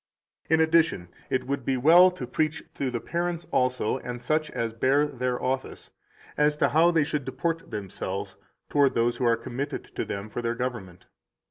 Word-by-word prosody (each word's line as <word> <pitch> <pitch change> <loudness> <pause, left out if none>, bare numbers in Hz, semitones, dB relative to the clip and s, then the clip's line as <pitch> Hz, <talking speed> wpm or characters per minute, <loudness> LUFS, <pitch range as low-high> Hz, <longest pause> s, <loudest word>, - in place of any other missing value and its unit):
167 160 - +4
In 160 0 +3 0.4
addition, 85 - -27
it 130 0 -1
would 140 -1 -2
be 130 +1 0
well 170 +8 +7
to 180 -8 -6
preach 150 +4 -1
to 135 - -2
the 120 -1 -3
parents 175 +4 -3
also, 125 -1 +1
and 125 -1 -6
such 155 +5 0
as 115 -1 -3
bear 135 +5 +3
their 125 -3 -2
office, 130 +1 -3 0.5
as 150 0 +3
to - - +3
how 165 +3 +5
they 165 -3 +3
should 145 0 -2
deport 165 +6 -3
themselves 100 -1 -5 0.3
toward 140 -2 +3
those 120 +1 +1
who 125 - -1
are 115 -1 +4
committed 130 +5 -4
to - - -1
them 100 +1 -5
for 115 +3 -5
their 115 0 -1
government. 110 -8 -5
130 Hz, 190 wpm, -26 LUFS, 120-150 Hz, 0.5 s, well